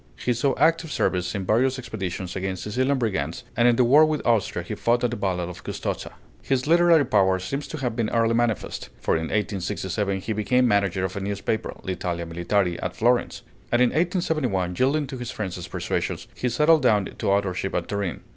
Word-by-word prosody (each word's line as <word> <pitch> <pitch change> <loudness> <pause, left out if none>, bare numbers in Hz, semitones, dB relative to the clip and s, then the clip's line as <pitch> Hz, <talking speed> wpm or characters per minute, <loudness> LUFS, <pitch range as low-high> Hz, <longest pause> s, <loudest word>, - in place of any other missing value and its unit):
He 125 - 0
saw 130 +4 +1
active 165 0 +2
service 90 -4 0
in 95 -2 -3
various 130 +6 +2
expeditions 95 -7 -5
against 95 -1 -3
Sicilian 130 +6 0
brigands; 95 - -2
and 120 +1 +4
in 120 - +5
the 125 - +4
war 140 +6 +6
with 155 -1 0
Austria 115 -4 +1
he - - -5
fought 120 +1 +1
at 120 - +1
the - - -2
battle 95 -4 -1
of 90 - -9
Custozza. - - -4 0.3
His 130 -2 0
literary 170 -1 +5
power 95 -3 +3
seems 135 +10 -4
to 155 - -6
have 125 -5 -2
been 115 -2 0
early 115 0 +2
manifest; 115 -2 -1
for - - 0
in 80 0 0
1867 95 0 -2
he 110 - -3
became 115 +5 +2
manager 100 -3 +1
of 95 - -5
a - - -2
newspaper, 100 +2 -3
L'Italia 90 -2 -3
Militare, 85 +2 0
at - - -3
Florence; 120 +2 +1 0.3
and 120 - +3
in 125 -1 +5
1871, 155 - 0
yielding 145 +3 +2
to 130 -2 -7
his 120 -1 -5
friends' 90 -4 -5
persuasions, - - -3
he 125 - -2
settled 150 +6 +4
down 105 -6 +3
to - - -4
authorship 95 -1 0
at - - -1
Turin. 100 -4 -3
110 Hz, 195 wpm, -24 LUFS, 95-130 Hz, 0.3 s, war